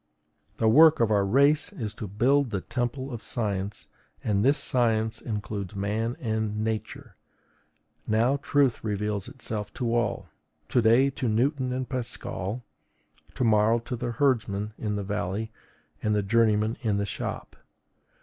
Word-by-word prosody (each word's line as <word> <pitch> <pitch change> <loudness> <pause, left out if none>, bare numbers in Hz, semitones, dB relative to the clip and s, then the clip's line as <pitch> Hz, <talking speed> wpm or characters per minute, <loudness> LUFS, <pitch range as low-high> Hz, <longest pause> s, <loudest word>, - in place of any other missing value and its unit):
The 110 - +2
work 155 +7 +7
of 115 -2 +2
our 100 -2 +3
race 140 +9 +3
is 110 -3 -5
to 105 - -6
build 125 +7 +2
the 100 -3 -2
temple 125 +4 -3
of 115 - -6
science, 100 -4 -3 0.4
and 100 -1 +1
this 140 +4 +4
science 110 -3 +1
includes 105 -3 -4
man 110 +4 -2
and 110 -2 -2
Nature. 110 -1 -4 0.9
Now, 115 +6 +2
truth 140 -2 +1
reveals 105 -2 -2
itself 105 -2 -5
to 120 -2 -1
all; 120 -2 -1 0.4
to 125 - +3
day 120 +5 +4
to 130 -2 -2
Newton 130 +4 +1
and 130 0 -2
Pascal, 120 -3 -3 0.7
tomorrow 110 -2 +3
to 120 +1 -5
the 120 0 -3
herdsman 110 -6 0
in 105 -2 -2
the 100 - -2
valley 105 +2 -3 0.5
and 105 0 +1
the 105 - +1
journeyman 110 +1 +2
in 105 -5 0
the 100 - 0
shop. 100 - -5
110 Hz, 145 wpm, -27 LUFS, 105-125 Hz, 0.9 s, work